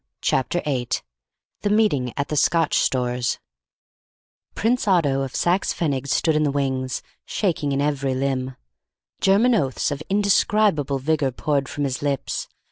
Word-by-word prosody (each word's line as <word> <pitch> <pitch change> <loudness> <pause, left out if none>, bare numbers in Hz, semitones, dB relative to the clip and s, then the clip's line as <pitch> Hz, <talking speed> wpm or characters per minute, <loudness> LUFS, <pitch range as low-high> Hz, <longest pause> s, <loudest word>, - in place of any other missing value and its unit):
Chapter 175 +7 0
8 130 -5 -1 0.6
THE 205 - 0
MEETING 205 - +2
AT 140 0 -2
THE 150 - -1
SCOTCH 165 +3 +2
STORES 125 -1 0 1.2
Prince 235 0 +1
Otto 150 -8 +3
of 135 -1 -4
Saxe 180 +3 +1
Pfennig 140 -5 -1
stood 160 +3 +2
in 155 - +2
the 150 - +2
wings, 130 -2 -2 0.2
shaking 165 -8 -1
in 135 0 0
every 140 -2 0
limb. 130 -1 -2 0.6
German 215 +6 +4
oaths 140 - 0
of 145 +1 -4
indescribable 200 -7 +2
vigour 145 +1 0
poured 140 +1 -1
from 145 - -3
his 135 -2 -2
lips. 140 -2 -2
145 Hz, 140 wpm, -23 LUFS, 135-175 Hz, 1.2 s, German